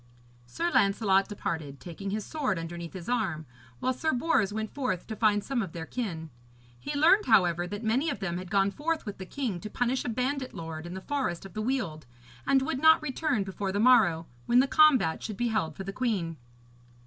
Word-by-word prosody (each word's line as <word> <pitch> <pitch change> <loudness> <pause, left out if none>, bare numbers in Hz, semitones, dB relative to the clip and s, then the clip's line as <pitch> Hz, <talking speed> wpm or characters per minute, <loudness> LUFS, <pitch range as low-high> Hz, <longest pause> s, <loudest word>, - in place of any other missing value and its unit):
Sir 340 - -2
Lancelot 195 -1 +3
departed, 160 -9 -4
taking 185 +3 -7
his 210 +1 -3
sword 270 - -1
underneath 170 0 -6
his 185 -2 -8
arm, 195 -11 -1 0.3
while 255 - 0
Sir 315 +5 0
Bors 245 -6 +1
went 220 +1 -4
forth 255 -11 -2
to 220 - -6
find 210 -2 +2
some 270 -3 -1
of 185 -6 -5
their 165 -1 -5
kin. 165 -8 -4 0.5
He 290 - -4
learned, 345 +8 +5
however, 180 -6 +4
that 205 +4 -6
many 250 +8 +1
of 285 - -3
them 175 -2 -2
had 185 -1 -8
gone 195 0 +2
forth 315 +5 -2
with 205 -3 -6
the 190 - -7
king 235 -9 -3
to 215 - -7
punish 245 +4 0
a - - -3
bandit 255 +3 -2
lord 165 0 -6
in 175 - -7
the 190 - -6
forest 255 -10 -2
of 195 - -11
the 215 - -3
Weald, 215 - -2 0.4
and 270 -1 +4
would 260 0 -2
not 315 +1 +6
return 265 -5 0
before 195 0 -4
the 200 - -1
morrow, 210 -9 +5 0.2
when 240 - +4
the 260 - +5
combat 270 - +4
should 215 -3 -5
be 240 +1 0
held 165 -9 -1
for 195 - -6
the 195 +1 -6
queen. 195 -10 -1
210 Hz, 210 wpm, -28 LUFS, 175-255 Hz, 0.5 s, not